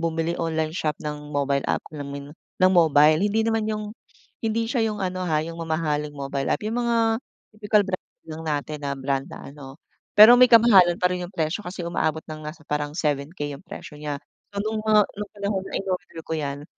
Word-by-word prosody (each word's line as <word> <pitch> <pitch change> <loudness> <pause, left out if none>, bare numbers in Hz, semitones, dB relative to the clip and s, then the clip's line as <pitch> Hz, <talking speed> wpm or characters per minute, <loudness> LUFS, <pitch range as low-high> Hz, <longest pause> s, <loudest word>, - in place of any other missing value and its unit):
bumili 165 0 -1
online 160 -1 -1
shop 155 -3 -2
ng 150 0 -5
mobile 140 -1 0
app, - - 0
alam 145 -2 -6
mo 140 - -6
'yon, 140 0 -8 0.3
ng 185 0 +5
mobile. 155 -2 +5
Hindi 210 +2 +1
naman 225 -1 +1
'yung 215 -1 -2 0.6
hindi 225 +1 0
siya 235 -5 +1
'yung 210 -1 -4
ano 185 0 -3
ha, 155 -2 +1
'yung 165 +1 -7
mamahaling 155 -2 -2
mobile 140 -1 -3
app, - - -2
'yung 220 +3 -2
mga 235 -1 +1 0.6
typical 210 0 +2
brand 185 - -4 0.2
lang 160 +1 -7
natin 150 0 -2
na 140 - -1
brand 135 0 -2
na - - -9
ano, 140 -1 -11 0.4
pero 215 +3 +11
may 250 - +8
kamahalan 195 -7 +7
pa 180 - +4
rin 180 - -3
'yung 180 - -10
presyo 160 +4 -1
kasi 180 0 -6
umaabot 160 -2 -1
ng 155 0 -7
nasa 155 +1 -8
parang 150 0 -2
7K 145 0 -2
'yung - - -15
presyo 160 -4 -9
niya. 150 -1 -3 0.4
So 200 - -3
no'ng 220 0 -2
mga 215 -1 +5
no'ng 205 0 -7
panahon 200 -1 -2
na - - -11
in-order 185 -3 -4
ko - - -6
'yan, 145 -1 -4
165 Hz, 210 wpm, -24 LUFS, 150-200 Hz, 0.6 s, pero